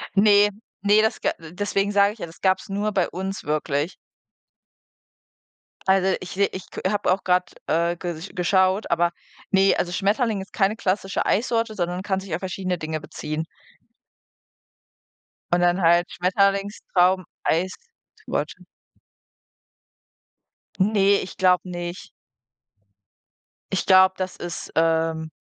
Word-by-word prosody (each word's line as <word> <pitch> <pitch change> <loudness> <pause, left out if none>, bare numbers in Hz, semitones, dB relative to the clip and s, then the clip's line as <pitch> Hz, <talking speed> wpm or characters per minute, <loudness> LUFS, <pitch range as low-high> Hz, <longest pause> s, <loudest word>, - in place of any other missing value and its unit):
Ne, 205 0 +6 0.3
ne, 205 +1 +5
das 220 +1 0
ga - - +1
deswegen 195 +4 -2
sage 200 0 +4
ich 225 - -20
ja, - - -4
das 165 0 -15
gab's 190 0 +1
nur 205 +2 -1
bei 190 -3 +1
uns 190 +2 -5
wirklich. 150 +1 -1 1.9
Also 190 0 +3
ich 185 - -8
se 200 +1 +2
ich 185 0 -8
k - - -6
habe 205 -3 +1
auch 190 - -4
grad, 180 0 +1 0.2
äh, 170 +2 +1
ges 175 0 -6
geschaut, 185 +2 +2
aber, 170 0 +2 0.4
ne, 195 0 +4
also 175 - -1
Schmetterling 210 +3 0
ist 190 - -11
keine 200 +1 +1
klassische 195 -2 -1
Eissorte, 230 0 0
sondern 180 0 -2
kann 190 -1 -1
sich 190 -3 -7
auf 160 - -1
verschiedene 185 -1 -3
Dinge 155 0 -3
beziehen. 155 +1 -5 2.1
Und 175 - +3
dann 175 +2 +2
halt 170 +1 +3
Schmetterlingstraum 190 -1 +1 0.2
Eistorte. 185 - -4 2.1
Ne, 200 0 +3
ich 185 - -8
glaube 185 -1 +3
nicht. 175 +1 -6 1.6
Ich 190 - -1
glaube, 190 0 +6
das 185 -1 -4
ist, 175 -1 -7
ähm 160 -1 +1
185 Hz, 125 wpm, -23 LUFS, 175-200 Hz, 2.1 s, Ne